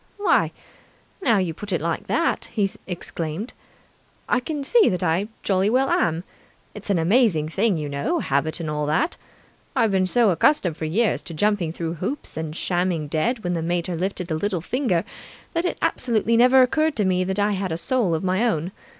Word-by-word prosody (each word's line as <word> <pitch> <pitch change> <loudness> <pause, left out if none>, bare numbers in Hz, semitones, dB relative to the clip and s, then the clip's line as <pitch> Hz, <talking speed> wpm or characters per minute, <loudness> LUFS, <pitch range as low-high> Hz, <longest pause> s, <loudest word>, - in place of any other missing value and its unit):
"Why, 410 - +2 0.7
now 235 - +3
you 180 -4 0
put 205 +5 -7
it 175 - +1
like 165 +1 -3
that," 335 - 0
he 205 -3 +2 0.2
exclaimed, 175 +3 -5 0.7
"I 245 - +2
can 290 +2 -4
see 450 - +4
that 180 0 -2
I 180 +4 +1 0.2
jolly 195 0 +2
well 260 +4 +2
am! 165 +1 +1 0.5
It's 210 0 -10
an 200 - +3
amazing 170 -3 +3
thing, 200 +2 +1
you 150 -1 -3
know, 140 0 -1
habit 140 +5 0
and 165 - -4
all 150 -1 -2
that. 295 - +1 0.6
I've 230 -5 +3
been 190 -1 +2
so 230 0 +3
accustomed 180 - +2
for 160 - -4
years 210 +8 +1
to 165 - -8
jumping 205 -2 +1
through 165 0 -4
hoops 270 +10 -4
and 160 -1 -4
shamming 175 -4 -1
dead 215 - 0
when 175 0 -1
the 165 - -1
mater 175 +1 -1
lifted 180 0 -3
a - - +1
little 190 +2 -1
finger, 185 - 0 0.5
that 335 0 0
it - - -1
absolutely 230 -2 +1
never 250 +2 +6
occurred 310 +4 +1
to 210 - +1
me 185 -1 +2
that 190 +1 -2
I 205 +1 +2
had 190 -2 -2
a 160 - -1
soul 205 -3 0
of 160 - -3
my 185 +4 +1
own. 175 -4 -1
185 Hz, 195 wpm, -23 LUFS, 165-230 Hz, 0.7 s, never